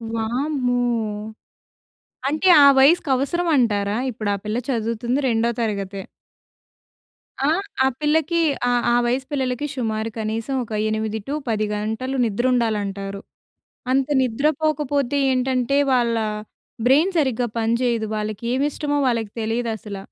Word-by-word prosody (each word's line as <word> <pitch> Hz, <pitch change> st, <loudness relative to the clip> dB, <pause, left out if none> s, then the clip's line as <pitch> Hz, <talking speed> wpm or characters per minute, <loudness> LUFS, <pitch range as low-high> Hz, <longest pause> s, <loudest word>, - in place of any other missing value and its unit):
వామ్మో! 245 Hz, +3 st, -1 dB, 1.5 s
అంటే 310 Hz, +6 st, 0 dB, 0.2 s
ఆ -, -, +9 dB
వయసుకి 300 Hz, +3 st, +4 dB
అవసరం 345 Hz, +7 st, -1 dB
అంటారా? 205 Hz, -4 st, +1 dB
ఇప్పుడు 215 Hz, -3 st, -4 dB
ఆ -, -, -4 dB
పిల్ల 210 Hz, +2 st, -1 dB
చదువుతుంది 235 Hz, +1 st, -1 dB
రెండో 230 Hz, -1 st, +1 dB
తరగతే. 200 Hz, -3 st, -3 dB, 1.4 s
ఆహ్, 335 Hz, +7 st, +1 dB, 0.2 s
ఆ -, -, +5 dB
పిల్లకి 320 Hz, +2 st, +1 dB, 0.3 s
ఆహ్, 245 Hz, -1 st, +1 dB
ఆ -, -, +3 dB
వయసు 255 Hz, +2 st, 0 dB
పిల్లలకి 260 Hz, -1 st, -1 dB
షుమారు 220 Hz, -4 st, -2 dB
కనీసం 225 Hz, +4 st, -2 dB
ఒక 230 Hz, -, -13 dB, 0.2 s
8 220 Hz, 0 st, -2 dB
టూ 280 Hz, -, -2 dB, 0.2 s
10 215 Hz, -1 st, 0 dB
గంటలు 220 Hz, +6 st, -3 dB
నిద్రుండాలంటారు. 210 Hz, -4 st, -1 dB, 0.7 s
అంత 265 Hz, 0 st, +2 dB
నిద్ర 255 Hz, +3 st, +1 dB
పోకపోతే 290 Hz, -3 st, 0 dB
ఏంటంటే 255 Hz, +1 st, +1 dB
వాళ్ళా 235 Hz, -3 st, +2 dB, 0.6 s
బ్రెయిన్ 300 Hz, +9 st, +4 dB
సరిగ్గా 255 Hz, -5 st, +1 dB
పనిచెయ్యదు. 230 Hz, 0 st, 0 dB
వాళ్ళకి 215 Hz, 0 st, -4 dB
ఏవి 270 Hz, +3 st, +1 dB
ఇష్టమో 290 Hz, 0 st, -1 dB
వాళ్ళకి 230 Hz, -4 st, -1 dB
తెలీదు 230 Hz, +2 st, -1 dB
అసల. 210 Hz, -2 st, -8 dB
240 Hz, 120 wpm, -22 LUFS, 220-270 Hz, 1.5 s, ఆ